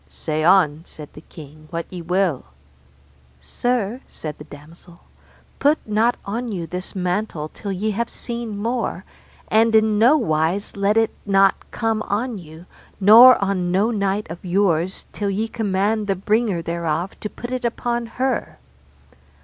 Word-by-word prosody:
Say 155 Hz, -1 st, -3 dB
on, 165 Hz, -4 st, +4 dB
said 150 Hz, -3 st, -12 dB
the 150 Hz, -, -12 dB
king, 155 Hz, -1 st, -14 dB
what 170 Hz, -1 st, -4 dB
ye 180 Hz, -, -5 dB
will. 180 Hz, -3 st, 0 dB, 0.9 s
Sir, 240 Hz, -, -2 dB
said 155 Hz, -2 st, -8 dB
the -, -, -8 dB
damosel, 165 Hz, +4 st, -14 dB, 0.6 s
put 295 Hz, +2 st, +4 dB
not 220 Hz, +3 st, +1 dB
on 230 Hz, +4 st, -3 dB
you 175 Hz, -4 st, -4 dB
this 180 Hz, +3 st, -6 dB
mantle 180 Hz, -4 st, -2 dB
till 200 Hz, +4 st, -6 dB
ye 205 Hz, +3 st, -1 dB
have 235 Hz, +3 st, -2 dB
seen 235 Hz, -3 st, -6 dB
more, 230 Hz, +3 st, -2 dB, 0.4 s
and 225 Hz, +1 st, +3 dB
in 215 Hz, -1 st, +3 dB
no 250 Hz, +8 st, +6 dB
wise 170 Hz, -, -1 dB
let 200 Hz, +2 st, +1 dB
it 225 Hz, -1 st, +3 dB
not 195 Hz, -1 st, +2 dB
come 225 Hz, -2 st, -1 dB
on 215 Hz, +2 st, -2 dB
you, 160 Hz, 0 st, -13 dB, 0.3 s
nor 230 Hz, +6 st, +9 dB
on 185 Hz, -3 st, -1 dB
no 200 Hz, +6 st, +2 dB
knight 200 Hz, -1 st, -1 dB
of 170 Hz, -, -8 dB
yours, 185 Hz, -1 st, 0 dB
till 205 Hz, -1 st, -2 dB
ye 210 Hz, +3 st, -1 dB
command 210 Hz, 0 st, -1 dB
the 195 Hz, -, +1 dB
bringer 205 Hz, -2 st, 0 dB
thereof 170 Hz, +1 st, -2 dB
to 210 Hz, -, -5 dB
put 240 Hz, +3 st, -8 dB
it 255 Hz, 0 st, -3 dB
upon 235 Hz, 0 st, -2 dB
her. 260 Hz, +1 st, -1 dB
200 Hz, 155 wpm, -21 LUFS, 170-225 Hz, 0.9 s, nor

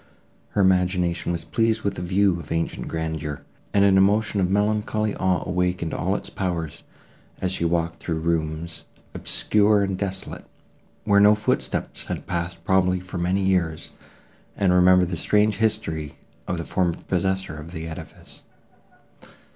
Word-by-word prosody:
Her -, -, +5 dB
imagination 90 Hz, -2 st, +2 dB
was 85 Hz, -1 st, -3 dB
pleased 115 Hz, -1 st, 0 dB
with 100 Hz, -, 0 dB
the 90 Hz, -, -6 dB
view 95 Hz, 0 st, +2 dB
of 75 Hz, -, -10 dB
ancient 80 Hz, 0 st, -2 dB
grandeur, 80 Hz, -3 st, -4 dB, 0.3 s
and 100 Hz, -1 st, +4 dB
an 95 Hz, -1 st, +5 dB
emotion 105 Hz, +1 st, +2 dB
of 90 Hz, -, +1 dB
melancholy 105 Hz, +1 st, 0 dB
awe 95 Hz, -1 st, 0 dB
awakened 90 Hz, -2 st, -1 dB
all 95 Hz, +4 st, 0 dB
its -, -, -4 dB
powers, 85 Hz, -4 st, -3 dB, 0.6 s
as 90 Hz, -, -1 dB
she 90 Hz, -3 st, -1 dB
walked 85 Hz, 0 st, 0 dB
through 80 Hz, -2 st, -3 dB
rooms, 80 Hz, 0 st, -2 dB, 0.3 s
obscure 105 Hz, -1 st, +2 dB
and 95 Hz, -1 st, -1 dB
desolate, 95 Hz, 0 st, -3 dB, 0.6 s
where 100 Hz, -2 st, +4 dB
no 105 Hz, +1 st, +7 dB
footsteps 105 Hz, +1 st, -2 dB
had -, -, -5 dB
passed 85 Hz, 0 st, -4 dB
probably 90 Hz, 0 st, +3 dB
for 90 Hz, 0 st, -7 dB
many 95 Hz, +3 st, +1 dB
years, 85 Hz, -4 st, 0 dB, 0.7 s
and 95 Hz, -2 st, +3 dB
remembered 90 Hz, 0 st, +5 dB
the 90 Hz, -, -3 dB
strange 105 Hz, +4 st, +2 dB
history 100 Hz, -9 st, -1 dB, 0.3 s
of 90 Hz, -, -1 dB
the 85 Hz, -, -4 dB
former 90 Hz, -2 st, 0 dB
possessor 95 Hz, -2 st, -1 dB
of 75 Hz, +2 st, -9 dB
the 80 Hz, -2 st, -6 dB
edifice. 80 Hz, -, -10 dB
90 Hz, 150 wpm, -24 LUFS, 85-100 Hz, 0.7 s, no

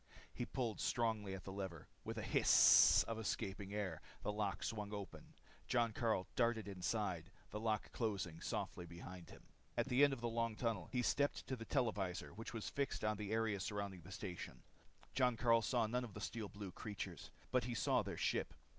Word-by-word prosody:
He 120 Hz, -, -3 dB
pulled 120 Hz, -5 st, -2 dB
strongly 110 Hz, -5 st, 0 dB
on 95 Hz, -, -7 dB
the 95 Hz, -, -6 dB
lever. 95 Hz, -5 st, -5 dB, 0.2 s
With -, -, -4 dB
a -, -, -2 dB
hiss -, -, +7 dB
of 115 Hz, -1 st, -4 dB
escaping 100 Hz, -2 st, -2 dB
air, 100 Hz, -6 st, -2 dB, 0.2 s
the -, -, 0 dB
lock 105 Hz, -3 st, -1 dB
swung 105 Hz, -2 st, -3 dB
open. 100 Hz, -1 st, -8 dB, 0.3 s
Jon 120 Hz, -2 st, +2 dB
Karyl 110 Hz, -5 st, +1 dB
darted 115 Hz, -3 st, +2 dB
inside, 95 Hz, -2 st, -1 dB, 0.2 s
the 105 Hz, -, -3 dB
door 110 Hz, -1 st, +2 dB
closing 95 Hz, -8 st, -2 dB
softly 90 Hz, -, -3 dB
behind. 85 Hz, +1 st, -9 dB, 0.4 s
At -, -, +1 dB
the 125 Hz, +3 st, +5 dB
end 145 Hz, -, +7 dB
of 135 Hz, -, -2 dB
the 120 Hz, -, 0 dB
long 115 Hz, -1 st, 0 dB
tunnel 110 Hz, -6 st, -1 dB
he 125 Hz, -2 st, +1 dB
stepped 145 Hz, +2 st, +1 dB
to 130 Hz, -, -2 dB
the 115 Hz, -2 st, -7 dB
televisor 105 Hz, -10 st, 0 dB
which 115 Hz, +2 st, -6 dB
was 115 Hz, -3 st, -4 dB
fixed 140 Hz, -5 st, -1 dB
on 105 Hz, -1 st, +1 dB
the 105 Hz, 0 st, -4 dB
area 110 Hz, -2 st, +1 dB
surrounding 100 Hz, -2 st, -3 dB
the 95 Hz, -, -12 dB
station. 90 Hz, -1 st, -6 dB, 0.5 s
Jon 125 Hz, -3 st, +3 dB
Karyl 115 Hz, 0 st, +5 dB
saw 115 Hz, +1 st, +2 dB
none 125 Hz, +3 st, 0 dB
of 115 Hz, -5 st, -8 dB
the -, -, -5 dB
steel 110 Hz, -4 st, -3 dB
blue 100 Hz, 0 st, -7 dB
creatures. 105 Hz, +1 st, -6 dB, 0.2 s
But 125 Hz, -2 st, +3 dB
he 120 Hz, -1 st, -2 dB
saw -, -, +3 dB
their -, -, -5 dB
ship. -, -, 0 dB
110 Hz, 190 wpm, -40 LUFS, 95-115 Hz, 0.5 s, hiss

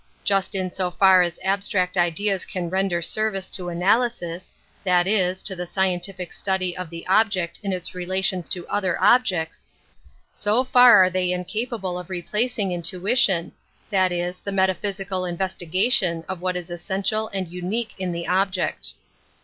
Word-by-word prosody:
Just 195 Hz, -1 st, +1 dB
in 185 Hz, -1 st, -1 dB
so 185 Hz, -1 st, -1 dB
far 190 Hz, +1 st, +5 dB
as 175 Hz, -1 st, -1 dB
abstract 190 Hz, -1 st, 0 dB
ideas 185 Hz, +3 st, +1 dB
can 175 Hz, -2 st, -5 dB
render 190 Hz, -2 st, 0 dB
service 195 Hz, 0 st, -1 dB
to 180 Hz, -2 st, -5 dB
analysis, 185 Hz, -1 st, 0 dB, 0.3 s
that 180 Hz, -2 st, +3 dB
is, 190 Hz, -2 st, +1 dB
to 190 Hz, -, -1 dB
the 180 Hz, 0 st, -5 dB
scientific 185 Hz, -1 st, -2 dB
study 190 Hz, -2 st, -1 dB
of 185 Hz, -2 st, -6 dB
the 170 Hz, 0 st, -8 dB
object 185 Hz, -3 st, +1 dB
in 200 Hz, -, -3 dB
its 180 Hz, -2 st, -4 dB
relations 185 Hz, 0 st, -1 dB
to 175 Hz, -2 st, -1 dB
other 190 Hz, -3 st, -1 dB
objects, 185 Hz, -10 st, +2 dB, 0.6 s
so 215 Hz, +5 st, +1 dB
far 245 Hz, -5 st, +7 dB
are 185 Hz, -, +3 dB
they 180 Hz, -1 st, 0 dB
incapable 185 Hz, +1 st, -3 dB
of 180 Hz, -, -9 dB
replac. 210 Hz, +7 st, -2 dB
ing 195 Hz, -4 st, 0 dB
intuition, 180 Hz, +2 st, +1 dB, 0.4 s
that 190 Hz, -2 st, +2 dB
is, 175 Hz, +1 st, -3 dB
the 200 Hz, -, -5 dB
metaphysical 190 Hz, 0 st, -1 dB
in 175 Hz, -1 st, -4 dB
vestigation 185 Hz, 0 st, +1 dB
of 190 Hz, -2 st, -5 dB
what 185 Hz, 0 st, -1 dB
is 175 Hz, -1 st, -7 dB
essential 200 Hz, +5 st, -1 dB
and 190 Hz, -4 st, -4 dB
unique 210 Hz, +6 st, -3 dB
in 185 Hz, -1 st, -2 dB
the 170 Hz, 0 st, -4 dB
object. 185 Hz, 0 st, 0 dB
185 Hz, 155 wpm, -23 LUFS, 180-200 Hz, 0.6 s, far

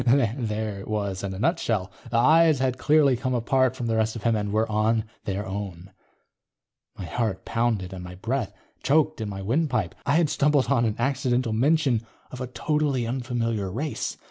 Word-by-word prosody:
_ 120 Hz, -3 st, +3 dB
There 110 Hz, -5 st, -3 dB
it 100 Hz, -, -9 dB
was 100 Hz, -3 st, -2 dB
in 100 Hz, -, -3 dB
a -, -, -6 dB
nutshell. 105 Hz, -, 0 dB, 0.2 s
The 115 Hz, -, 0 dB
eyes 155 Hz, +5 st, +5 dB
had 130 Hz, -1 st, -1 dB
clearly 150 Hz, -3 st, +4 dB
come 130 Hz, +1 st, -2 dB
apart 130 Hz, +2 st, +2 dB
from 125 Hz, -, -4 dB
the 115 Hz, -1 st, 0 dB
rest 110 Hz, 0 st, +1 dB
of 115 Hz, -, -7 dB
him 115 Hz, -1 st, +2 dB
and 105 Hz, -1 st, -2 dB
were 110 Hz, +2 st, +1 dB
on 110 Hz, +1 st, +1 dB, 0.2 s
their 100 Hz, +1 st, -2 dB
own. 95 Hz, -2 st, -6 dB, 1.1 s
My 95 Hz, -, -5 dB
heart 95 Hz, 0 st, -2 dB
pounded 110 Hz, -5 st, -1 dB
and 90 Hz, -1 st, -7 dB
my 90 Hz, 0 st, -8 dB
breath 115 Hz, +4 st, -2 dB, 0.3 s
choked 155 Hz, 0 st, +2 dB
in 110 Hz, -, -3 dB
my 95 Hz, -1 st, -6 dB
windpipe. 120 Hz, -, 0 dB
I 140 Hz, -, +1 dB
had 160 Hz, -3 st, +3 dB
stumbled 145 Hz, -2 st, +2 dB
on 120 Hz, -4 st, +3 dB
an 110 Hz, -2 st, 0 dB
accidental 125 Hz, -2 st, 0 dB
mention 135 Hz, -1 st, +2 dB, 0.3 s
of 130 Hz, -, -7 dB
a 130 Hz, -, -3 dB
totally 145 Hz, -1 st, 0 dB
unfamiliar 115 Hz, -5 st, -2 dB
race. 145 Hz, +9 st, -3 dB
115 Hz, 190 wpm, -25 LUFS, 105-135 Hz, 1.1 s, eyes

